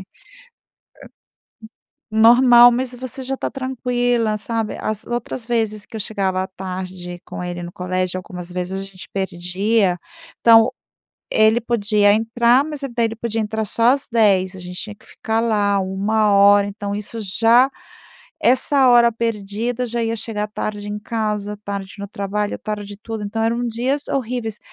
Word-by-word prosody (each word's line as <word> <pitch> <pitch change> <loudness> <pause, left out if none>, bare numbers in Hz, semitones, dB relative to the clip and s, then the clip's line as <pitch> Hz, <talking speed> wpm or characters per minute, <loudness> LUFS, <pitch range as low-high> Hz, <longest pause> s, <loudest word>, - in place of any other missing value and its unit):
hum. 190 - -11 2.2
Normal. 240 +1 +8
Mas 250 +1 -2
você 255 +1 -6
já 270 +1 -3
está - - -3
tranquila, 245 -4 -1
sabe? 225 0 -3
As 215 -1 -3
outras 240 0 -4
vezes 220 -3 -1
que - - -12
eu 220 - -4
chegava 190 -3 -1
tarde 185 -1 -6
com - - -7
ele 175 0 -5
no 175 - -7
colégio, 185 0 -2
algumas 180 -1 -8
vezes 180 +2 -3
a - - -6
gente 190 -2 -12
perdia 190 +2 0 0.5
então, 225 0 +6 0.6
ele 220 +2 +4
podia 210 -3 +3
entrar, 235 +4 +3
mas 300 -2 -6
daí 240 -4 -1
ele 225 0 -3
podia 225 -1 -2
entrar 220 0 -2
só 230 +4 +3
às 275 0 0
10h. 195 -5 +3
A - - -9
gente 180 +1 -7
tinha 210 -1 -7
ficar 225 0 -3
lá 205 -3 +1
1 205 +3 +1
hora, 200 0 +5
então 205 0 -5
isso 210 +2 -6
já 230 +6 +4 0.7
essa 265 +1 +4
hora 240 -1 +6
perdida 230 +2 -2
já 235 0 -2
ia 225 0 -1
chegar 210 -1 -3
tarde 210 -1 -5
em 210 0 -4
casa, 210 -2 -3
tarde 200 -1 -5
no 200 - -5
trabalho, 205 +1 -3
tarde 210 -1 -5
em 200 - -17
tudo 225 -2 -5
então 225 +2 -3
eram 235 +2 0
dias 255 +5 -1
horríveis. 240 -4 -3
215 Hz, 160 wpm, -20 LUFS, 200-235 Hz, 2.2 s, Normal